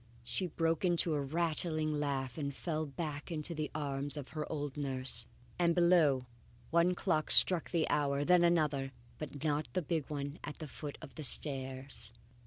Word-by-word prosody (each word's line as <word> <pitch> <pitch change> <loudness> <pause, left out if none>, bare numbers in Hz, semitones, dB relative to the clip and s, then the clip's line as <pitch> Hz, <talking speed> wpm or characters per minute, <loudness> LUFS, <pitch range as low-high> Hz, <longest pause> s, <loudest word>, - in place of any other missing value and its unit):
she 180 +9 -2
broke 165 0 -1
into 175 -2 +2
a 145 - 0
rattling 155 +1 0
laugh, 140 -4 -2
and 140 -3 -4
fell 155 -2 -3
back 150 +2 -5
into 160 +1 -1
the 155 -2 -3
arms 145 -1 -3
of 140 -2 -7
her 155 -1 -5
old 145 -3 -4
nurse. 130 -5 -1 0.3
And 170 -1 +3
below, 170 -7 +4 0.5
one 170 +2 +3
clock 165 -5 0
struck 180 -4 +6
the 170 -3 0
hour 140 -2 +1
and 145 - -2
then 180 -1 +5
another. 150 -6 +1 0.3
But 145 -1 -7
not 150 0 0
the 185 - -1
big 155 -2 -2
one 145 0 -5
at 145 - -6
the 155 - -7
foot 145 0 -8
of - - -10
the 155 - -7
stairs. 130 -3 +2
150 Hz, 180 wpm, -33 LUFS, 140-165 Hz, 0.5 s, struck